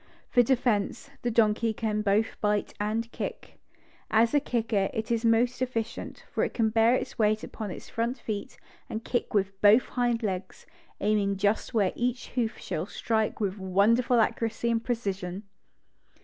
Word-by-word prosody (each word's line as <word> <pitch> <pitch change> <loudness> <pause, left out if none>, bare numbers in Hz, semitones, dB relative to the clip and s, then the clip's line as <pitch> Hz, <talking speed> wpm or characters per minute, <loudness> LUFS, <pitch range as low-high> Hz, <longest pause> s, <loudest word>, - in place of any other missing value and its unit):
For 245 - +6
defense, 245 0 0
the 240 - 0
donkey 225 0 +2
can 215 -1 -1
both 210 +2 +1
bite 210 -1 0
and 220 +3 -1
kick. - - -6 0.5
As 225 +3 +3
a 290 - +5
kicker 225 -7 0
it 220 +1 -3
is 230 0 +1
most 235 +2 +2
efficient, 240 -3 -3
for - - 0
it - - -2
can 220 -2 +2
bear 225 +2 +4
its - - -4
weight 215 0 +2
upon 215 -2 -6
its 180 - -8
front 235 +3 -2
feet 210 -2 -5 0.3
and 220 +1 -5
kick 240 -3 -2
with 195 -1 0
both 210 +4 +6
hind 240 -2 0
legs, 185 -2 -4 0.4
aiming 200 -1 +1
just 205 +4 0
where 200 -4 +2
each 245 +1 -2
hoof 240 -3 -1
shall - - -4
strike 220 -2 -1
with 200 -1 -2
wonderful 220 +6 +3
accuracy 230 +1 0
and 230 0 0
precision. 195 -5 -3
220 Hz, 165 wpm, -28 LUFS, 205-235 Hz, 0.5 s, For